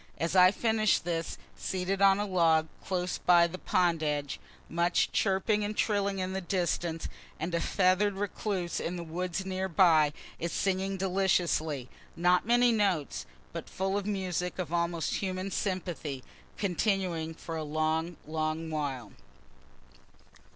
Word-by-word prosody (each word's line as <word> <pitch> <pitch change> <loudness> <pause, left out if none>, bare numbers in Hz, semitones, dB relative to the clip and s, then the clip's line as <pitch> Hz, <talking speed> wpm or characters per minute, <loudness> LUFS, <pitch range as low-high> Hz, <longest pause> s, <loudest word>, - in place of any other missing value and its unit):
As 165 +3 -1
I 180 0 +8
finish 220 +1 +2
this, 165 -1 -3 0.2
seated 190 +1 -2
on 195 0 +6
a 205 - 0
log 165 -4 +3 0.2
close 180 -1 -2
by 175 -1 +5
the 175 +2 -5
pond 170 -3 +1
edge, 145 -2 -2 0.3
much 170 +2 +1
chirping 210 +2 +1
and 210 +1 -3
trilling 200 -2 +1
in 185 0 -2
the 190 - -2
distance, 175 -2 -1 0.3
and 165 +3 -3
a 170 - +1
feather'd 195 +3 +2
recluse 195 -2 -2
in 175 - -3
the 175 - -5
woods 180 +3 -3
near 190 0 -2
by 160 -4 +5 0.3
is 170 +1 -2
singing 195 0 0
deliciously 180 -7 +1 0.3
not 180 +3 +3
many 240 0 +5
notes, 195 - 0 0.3
but - - -6
full 190 +1 -1
of 205 0 -2
music 180 -3 -2
of 175 -3 -4
almost 170 -1 0
human 190 0 -3
sympathy 175 -9 -3 0.3
continuing 180 -4 0
for 165 0 -6
a 160 - -3
long, 155 +2 -1
long 155 +1 -2
while. 135 -8 -3
180 Hz, 145 wpm, -30 LUFS, 165-195 Hz, 0.3 s, I